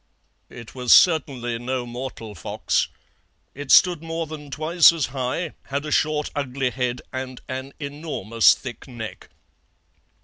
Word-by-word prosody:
"It 115 -2 -11
was 125 -2 -1
certainly 135 -8 +4
no 125 +1 -3
mortal 120 -3 -7
fox. 85 - -1 0.7
It 140 0 -8
stood 175 -4 +6
more 165 0 -3
than 150 -2 -9
twice 160 +4 +5
as 165 -4 -1
high, 135 +5 -2
had 140 +2 -3
a 150 - -5
short, 150 0 +1
ugly 135 -2 -1
head, 125 -1 -2
and 130 -1 -5
an 130 +1 -6
enormous 140 -7 +2
thick 125 +1 -9
neck. 120 -4 -8
135 Hz, 135 wpm, -23 LUFS, 125-150 Hz, 0.7 s, stood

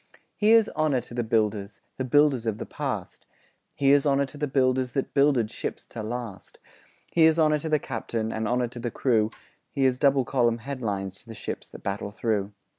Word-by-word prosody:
Here's 220 +1 +5
honour 155 -4 +1
to 120 - -13
the 120 - -1
builders 105 -2 -1
– - - -48
The 130 - -1
builders 135 -3 +3
of 110 -2 -1
the - - -5
past; - - -5 0.5
Here's 140 0 +4
honour 140 -1 +2
to 140 +2 -12
the 150 - 0
builders 130 -2 +1
That 135 - -2
builded 140 -6 +3
ships - - -5
to 115 - -6
last; 115 -2 -6 0.5
Here's 160 -1 +5
honour 155 -2 +3
to 160 - -4
the 155 - +4
captain, 115 -4 -3
And 110 0 -2
honour 125 +1 0
to 120 - -9
the 120 0 -2
crew; 110 -3 +1 0.4
Here's 130 -3 +1
double 140 -3 +3
column 120 -3 +2
headlines 105 -7 -4
To - - -16
the 115 - -9
ships - - -6
that - - -12
battle 100 +1 -3
through. 105 -1 -1
125 Hz, 190 wpm, -26 LUFS, 110-140 Hz, 0.5 s, Here's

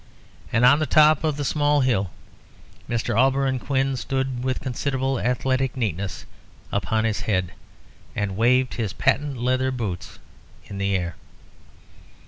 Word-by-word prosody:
And 120 +2 +3
on 135 +4 +6
the 155 - 0
top 155 +2 +5
of 155 -2 0
the 145 - -2
small 145 +1 +2
hill 115 -8 +1 0.8
Mr. 120 -1 -1
Auberon 135 +1 +2
Quin 135 0 0
stood 130 -1 -2
with 130 -1 -1
considerable 135 0 -2
athletic 130 +1 0
neatness 100 -5 -3 0.5
upon 100 +3 0
his 110 -2 0
head, 90 -4 0 0.6
and 100 -2 -2
waved 125 +4 +3
his 110 -6 -3
patent 140 +8 0
leather 130 +2 +1
boots 95 - -5 0.5
in 100 - -7
the 100 0 +1
air. 90 -2 -3
125 Hz, 135 wpm, -23 LUFS, 105-135 Hz, 0.8 s, on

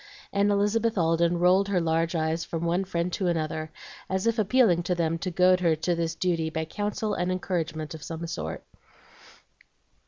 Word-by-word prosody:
And 200 +1 +3
Elizabeth 210 +2 +1
Alden 170 0 +2
rolled 185 +3 +4
her 195 -3 +1
large 165 +1 0
eyes 160 +1 0
from 165 0 -4
one 175 +3 +1
friend 175 -1 -2
to 190 - -1
another, 160 -2 -2 0.4
as 190 +1 -1
if 230 0 +1
appealing 215 -4 +3
to 180 +1 -1
them 165 -1 0
to 185 - -3
goad 180 +1 +4
her 170 -3 +2
to 165 +3 -1
this 165 -1 -2
duty 165 -2 0
by 160 0 -3
counsel 210 +4 -2
and 180 +1 -1
encouragement 170 -4 -3
of 160 - -9
some 165 +2 -5
sort. 80 - -5
170 Hz, 180 wpm, -27 LUFS, 165-190 Hz, 0.4 s, rolled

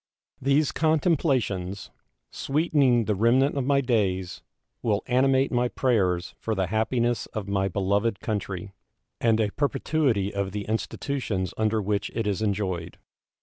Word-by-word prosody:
These 140 +3 +2
contemplations, 135 - 0 0.4
sweetening 135 -5 +2
the 105 - +1
remnant 120 +8 +3
of 135 -3 -1
my 140 -1 +3
days, 95 -8 0 0.4
will 105 -3 0
animate 130 +2 +2
my 125 0 +2
prayers 95 -9 0
for 110 - -2
the 95 -1 0
happiness 120 +1 0
of 105 -2 -4
my 95 -1 0
beloved 100 +3 0
country, 100 -3 -4 0.5
and 115 -1 +2
a 105 -2 +1
perpetuity 135 -7 0
of 100 -1 -2
the 105 -1 -3
institutions 110 -3 -2
under 110 -1 0
which 100 0 -1
it 115 -1 -1
is 105 0 -1
enjoyed. 95 -5 -2
110 Hz, 135 wpm, -26 LUFS, 100-130 Hz, 0.5 s, remnant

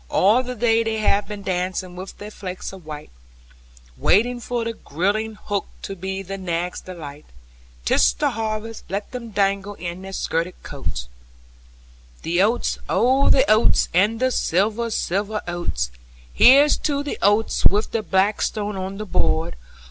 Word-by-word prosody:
All 215 +7 +4
the 250 0 -5
day 230 0 +3
they 225 -1 -1
have 205 -1 +2
been 205 -1 -7
dancing 185 0 -2
with 185 +2 -8
their 210 +1 -8
flakes 185 -2 -6
of 185 -5 -12
white, 150 -1 -8 0.8
Waiting 240 - +3
for 240 0 -2
the 230 - -2
girding 215 +5 -1
hook, 205 -1 -3 0.2
to 195 - -5
be 190 +1 -4
the 195 +1 -6
nags' 175 -1 -2
delight: 150 -5 -9 0.6
'Tis 65 0 +4
the - - 0
harvest, 220 0 -4
let 200 +2 -3
them 245 -3 -6
dangle 200 0 0
in 175 0 -6
their 195 0 -8
skirted 170 -1 -2
coats. - - -4
(Chorus) 60 - -20 1.1
The 175 +2 +1
oats, 225 +5 +1
oh 260 +4 +3
the 265 0 +5
oats, 215 +1 +4
and 205 +6 +3
the 255 0 +2
silver, 215 +4 +1
silver 210 0 -1
oats! 175 - -2 0.4
Here's 280 +4 +7
to 285 -1 -1
the 290 - -4
oats 205 +2 +4
with 210 +2 0
the 225 - 0
blackstone 205 +1 0
on 190 +1 -4
the 215 - -5
board! 80 - 0
200 Hz, 160 wpm, -22 LUFS, 185-225 Hz, 1.1 s, Here's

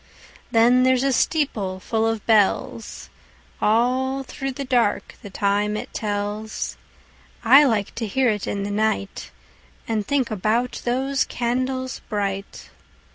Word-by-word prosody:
Then 240 +2 +4
there's 255 0 +3
a 275 -1 +2
steeple 215 -11 0
full 225 +3 0
of 225 -2 -2
bells, 220 +1 +1 0.5
All 255 +4 +1
through 270 +1 -5
the 275 +2 -5
dark 240 -5 +1
the 205 - -9
time 205 +1 0
it - - -7
tells.I 215 +5 0
like 215 -6 0
to 225 - -4
hear 255 +4 +2
it 210 -2 -2
in 200 -1 -2
the 205 - -3
nightAnd 215 0 -4
think 270 -5 0
about 220 +5 0
those 265 +3 +1
candles 255 +1 -2
bright. 200 -2 -4
225 Hz, 125 wpm, -23 LUFS, 205-255 Hz, 0.5 s, Then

